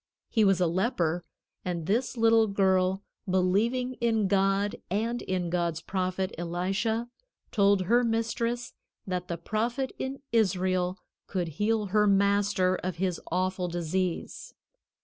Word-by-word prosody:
He 220 - +3
was 195 -3 +4
a 180 - +3
leper, 175 -2 0 0.4
and 175 -3 -3
this 240 +7 0
little 225 -1 +5
girl, 190 -1 +2 0.3
believing 215 +8 +1
in 225 -3 +2
God 195 +1 +1
and 230 +5 -1
in 180 -2 -2
God's 170 -2 0
prophet, 185 +2 -2
Elisha, 195 +7 -1 0.4
told 200 -2 +4
her 240 +6 +3
mistress 230 +1 -1 0.3
that 180 -1 -3
the 170 - -3
prophet 235 +8 -2
in 265 +1 -4
Israel 185 -4 +1 0.3
could 180 -4 -2
heal 210 +6 0
her 210 -1 +4
master 200 -2 +3
of 185 -2 -4
his 180 -1 -1
awful 185 +1 0
disease. 175 +1 -3
195 Hz, 130 wpm, -28 LUFS, 180-225 Hz, 0.4 s, little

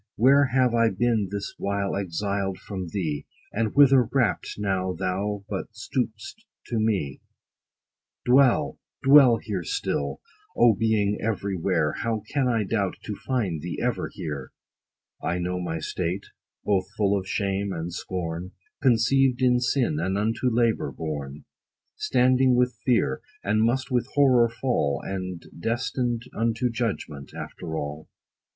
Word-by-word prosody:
Where 140 +5 +5
have 130 -2 +2
I 115 -1 +4
been 110 0 +1
this 100 0 -4
while 100 0 -1
exiled 100 +1 -2
from 95 -3 -6
thee, 80 -6 -3 0.3
And 110 0 -1
whither 135 -4 +6
rapt, 125 -5 0
now 95 -2 -1
thou 95 +2 -2
but 100 -3 -4
stoop'st 115 - -4 0.3
to 115 - 0
me? 100 - 0 1.0
Dwell, 130 0 +4 0.2
dwell 135 -4 +7
here 100 -4 -4
still! 70 -3 -2 0.4
O, 120 -1 +6
being 105 -1 +1
every 100 -3 -1
where, 85 -4 +1
How 110 -2 -1
can 140 -3 +2
I 115 -3 +1
doubt 100 -2 -1
to 105 - -4
find 100 - -2
thee 85 +2 -5
ever 125 0 -1
here? 75 -7 -5 0.7
I 85 - -1
know 90 +1 -2
my 80 -2 -3
state, 90 +4 -3 0.4
both 95 -3 +1
full 100 -1 +3
of 95 -1 -3
shame 100 0 -1
and 85 0 -4
scorn, 90 0 -4 0.3
Conceived 130 +1 +3
in 125 -1 +4
sin, 125 - +1
and 95 +4 0
unto 115 +4 +1
labor 115 -1 +1
born, 75 -3 -5 0.5
Standing 130 0 +3
with 125 0 +2
fear, 125 -2 +2 0.2
and 110 +1 +2
must 125 +4 +1
with 125 -1 +1
horror 130 -5 +5
fall, 115 - 0
And 95 -3 -5
destined 120 +2 -1
unto 115 +2 0
judgment, 100 - -4
after 80 -2 -6
all. 75 +1 -5
105 Hz, 140 wpm, -25 LUFS, 90-120 Hz, 1.0 s, dwell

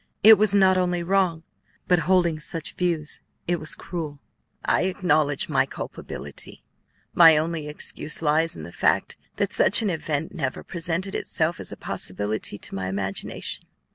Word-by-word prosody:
It 220 0 +9
was 210 -2 +3
not 190 -2 +5
only 180 -1 0
wrong, 180 -3 +1 0.4
but, 180 -1 +4
holding 175 -4 +3
such 160 +1 -5
views, 165 -4 -2 0.3
it 175 0 0
was 155 - -2
cruel." 155 -5 -6 0.5
"I - - +2
acknowledge 155 -6 +1
my - - +2
culpability; 70 0 -7 0.5
my 165 -2 +8
only 160 -1 -2
excuse 150 +1 -4
lies 160 +2 +2
in 80 - -8
the 85 - -9
fact - - +1 0.2
that - - -1
such 205 - +5
an 205 - +1
event 160 +1 -3
never 135 -7 -3
presented 175 +2 -2
itself 165 +2 -1
as - - -4
a - - -8
possibility 105 +2 -3
to - - -8
my 95 -1 -3
imagination. 95 0 -1
165 Hz, 155 wpm, -24 LUFS, 150-180 Hz, 0.5 s, It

